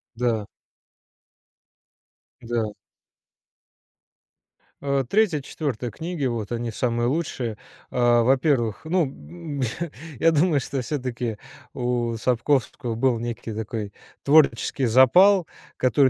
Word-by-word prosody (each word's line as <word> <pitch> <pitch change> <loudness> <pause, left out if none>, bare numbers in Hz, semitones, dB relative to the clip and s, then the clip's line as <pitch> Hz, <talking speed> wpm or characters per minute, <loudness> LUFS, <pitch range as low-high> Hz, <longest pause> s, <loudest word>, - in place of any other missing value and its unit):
Да. 115 -3 0 2.0
Да. 115 -2 -2 2.1
А, 140 -1 +1
3-4 145 - -1
книги, 165 - -4
вот 115 -4 -2
они 120 -1 -2
самые 120 +1 0
лучшие. 130 -7 -2 0.3
А, 120 -1 +4
во-первых, 130 -4 +2
ну, 135 - -3 0.6
я 165 - +5
думаю, 155 -1 +3
что 135 +1 -3
всё-таки 125 -5 -3 0.4
у 120 -1 -1
Сапковского 125 0 0
был 120 -1 +1
некий 120 -1 -5
такой 105 -1 -4 0.3
творческий 140 -3 +3
запал, 175 - +6 0.3
который 130 +2 +4
у - - +2
125 Hz, 95 wpm, -24 LUFS, 115-145 Hz, 2.1 s, запал